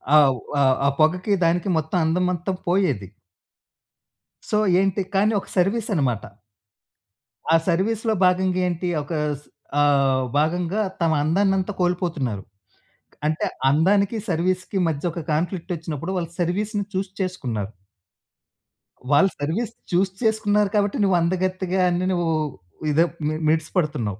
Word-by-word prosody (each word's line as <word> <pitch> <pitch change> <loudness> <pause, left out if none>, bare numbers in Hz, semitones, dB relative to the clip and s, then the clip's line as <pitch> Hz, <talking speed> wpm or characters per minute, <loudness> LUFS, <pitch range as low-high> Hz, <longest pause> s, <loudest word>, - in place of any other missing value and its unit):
ఆహ్, 135 -4 +5 0.2
ఆహ్, 130 -1 +4
ఆ - - +5
పొగకి 180 +6 +2
దానికి 175 +3 +1
మొత్తం 160 +4 -1
అందమంతా 180 +2 0 0.2
పోయేది. 155 - +1 1.4
సో 210 - +2 0.2
ఏంటి 195 0 +1
కానీ, 210 +3 +3
ఒక - - -13
సర్విస్ 215 +5 +1
అన్నమాట. 130 - 0 1.3
ఆ - - +6
సర్విస్‌లో 220 +6 +1
భాగంగా 185 0 +2
ఏంటి? 175 +1 -2 0.2
ఒక 155 - -7 0.3
స్ - - -21 0.4
ఆహ్, 135 -2 +3
భాగంగా 175 +6 +1 0.2
తమ 165 - +3
అందాన్నంతా 195 +4 +1
కోల్పోతున్నారు. 165 - -1 0.8
అంటే, 155 +1 0 0.2
అందానికి 200 - +3
సర్విస్‌కి 185 +3 -1
మధ్య 150 -3 -2
ఒక 170 +1 -5
కాన్‌ఫ్లిక్ట్ 175 +3 -2
వచ్చినప్పుడు, 165 +1 -5
వాళ్ళు 170 -2 -3
సర్విస్‌ని 205 +4 -1
చూస్ 190 0 -2
చేసుకున్నారు. 120 - -3 1.4
వాళ్ళు 190 +7 +5
సర్విస్ 185 +11 -2 0.2
చూస్ 185 +2 +2
చేసుకున్నారు 210 -2 +2
కాబట్టి, 205 -1 +1
నువ్వు 190 -2 +3
అందగత్తెగా 185 +1 0
అని 175 +1 0
నువ్వు 175 -2 0 0.6
ఇదే 165 +3 +4 0.2
మి 155 - 0 0.2
మిడిసి 160 0 0
పడుతున్నావు. 130 - -1
180 Hz, 120 wpm, -23 LUFS, 155-195 Hz, 1.4 s, ఆ